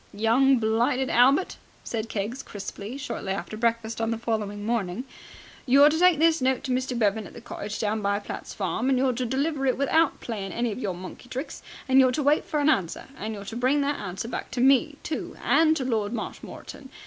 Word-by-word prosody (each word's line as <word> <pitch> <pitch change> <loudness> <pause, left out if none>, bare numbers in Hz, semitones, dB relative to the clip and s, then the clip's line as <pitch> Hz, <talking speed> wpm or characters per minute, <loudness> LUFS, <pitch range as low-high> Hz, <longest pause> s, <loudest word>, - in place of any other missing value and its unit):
"Young 245 +5 +4
blighted 240 +4 +1
Albert," 270 +9 +4 0.3
said 225 -1 -4
Keggs 220 +6 -3
crisply, 205 +2 -7
shortly 235 -8 -4
after 200 +2 -5
breakfast 230 0 -1
on 225 - 0
the 230 - -1
following 210 -3 -3
morning, 225 -1 -1 0.6
"you're 280 +4 +7
to 320 - 0
take 360 -2 +5
this 325 0 +3
note 260 0 +1
to 260 - -3
Mr. 255 0 -1
Bevan 215 -1 +1
at - - -14
the - - -8
cottage 215 -2 -6
down 215 0 -1
by 200 0 +1
Platt's 205 - -7
farm, 225 +6 -1
and 265 - +3
you're 260 0 +2
to 250 +1 -2
deliver 275 +3 -1
it 255 - +2
without 295 +3 +2
playing 205 -5 -5
any 235 -1 -1
of 210 - -5
your 190 -7 -2
monkey 185 +7 -10
tricks, 265 +4 -5 0.3
and 265 0 +5
you're 260 -1 +6
to 295 - -1
wait 290 +2 +3
for 300 - -1
an 290 - +2
answer, 195 - 0
and 215 -1 -5
you're 200 -1 -8
to 200 - -7
bring 260 +4 +2
that 285 +1 -1
answer 190 +3 -5
back - - -5
to - - -5
me, 275 +3 +4
too, 310 - -5
and 320 0 +4
to 260 - -2
Lord 220 -3 -1
Marshmoreton. 265 +4 -7
240 Hz, 215 wpm, -26 LUFS, 215-270 Hz, 0.6 s, you're